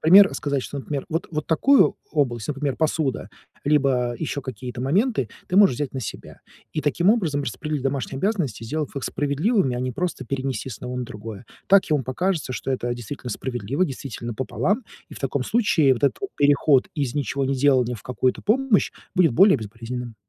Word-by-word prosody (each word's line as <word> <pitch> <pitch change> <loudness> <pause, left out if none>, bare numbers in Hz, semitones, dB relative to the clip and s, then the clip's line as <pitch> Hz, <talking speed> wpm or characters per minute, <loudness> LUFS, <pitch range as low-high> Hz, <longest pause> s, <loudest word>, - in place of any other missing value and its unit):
например, 190 +5 +7
сказать, 140 -3 -1
что, - - -6
от 135 - -5
например, 145 -3 -3
вот 165 0 -2
вот 155 -1 -2
такую 265 - +4 0.2
область, 120 -7 0
например, 140 -2 -2
посуда 155 -4 0 0.4
либо 135 -4 +2
ещё 145 -2 -3
какие-то 125 -1 -6
моменты, 175 - +1 0.2
ты 180 - 0
можешь 200 -9 +7
взять 140 +1 -3
на 130 - -2
себя - - -8 0.3
и 155 - -1
таким 155 +6 +2
образом 165 -11 +1
распределить 145 +3 -3
домашние 135 0 -2
обязанности, 185 - -1
сделав 150 +5 -3
их 140 - -4
справедливыми, 145 - +1
а 120 - -3
не 130 0 -1
просто 175 +8 -3
перенести 135 +1 -3
с 120 - -6
одного 125 +2 -6
на 125 - -2
другое. 110 -2 -8 0.2
Так 195 0 +5
ему 150 -3 +2
покажется, 160 +2 -1
что 125 +3 -4
это 120 -2 -1
действительно 120 +2 -7
справедливо, 125 - -1
действительно 130 - -5
пополам, 130 - -1 0.2
и - - -11
в - - -9
таком 135 0 -1
случае 165 - +3
вот 125 - -1
этот 140 - +1
вот 395 - -4
переход 145 -2 +4
из 140 -5 -2
ничегонеделания 135 -2 +1
в 100 - -14
какую-то 125 0 0
помощь 240 0 +2 0.2
будет 175 -6 +4
более 190 - +6
безболезненным. 115 +2 -6
140 Hz, 185 wpm, -23 LUFS, 125-160 Hz, 0.4 s, например